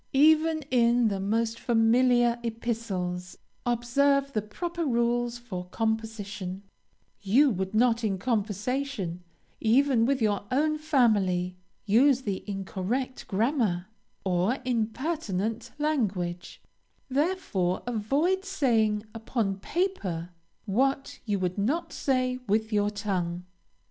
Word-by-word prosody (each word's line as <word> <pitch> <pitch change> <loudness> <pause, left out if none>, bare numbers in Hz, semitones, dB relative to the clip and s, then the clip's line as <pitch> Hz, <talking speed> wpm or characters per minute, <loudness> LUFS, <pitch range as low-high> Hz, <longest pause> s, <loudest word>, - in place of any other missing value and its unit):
Even 315 +2 +4
in 240 -2 +4
the 200 -1 -2
most 225 +3 0
familiar 240 +1 +3
epistles, 215 -6 -3 0.3
observe 275 +4 +2
the 215 - +1
proper 340 - -4
rules 240 -2 +1
for 190 -7 -6
composition; 205 -3 -3 0.6
you 255 +8 +4
would 190 0 -3
not 235 0 +3
in 200 -3 0
conversing, 210 -2 -2 0.4
even 245 +1 +3
with 275 0 +1
your 210 -3 +1
own 305 +4 +1
family, 205 - +2 0.3
use 250 +5 +4
incorrect 200 +5 -3
grammar, 210 - 0 0.4
or 185 +7 +1
impertinent 230 - -2
language; 200 - -2 0.4
therefore 270 - 0
avoid 275 - 0
saying 230 - +1
upon 225 -3 -2
paper 195 - -2 0.3
what 270 +6 0
you 205 -3 0
would 185 +1 -2
not 285 +12 -1
say 255 -2 0
with 220 +2 +1
your 205 0 +2
tongue. 185 -4 -2
225 Hz, 105 wpm, -27 LUFS, 200-265 Hz, 0.6 s, Even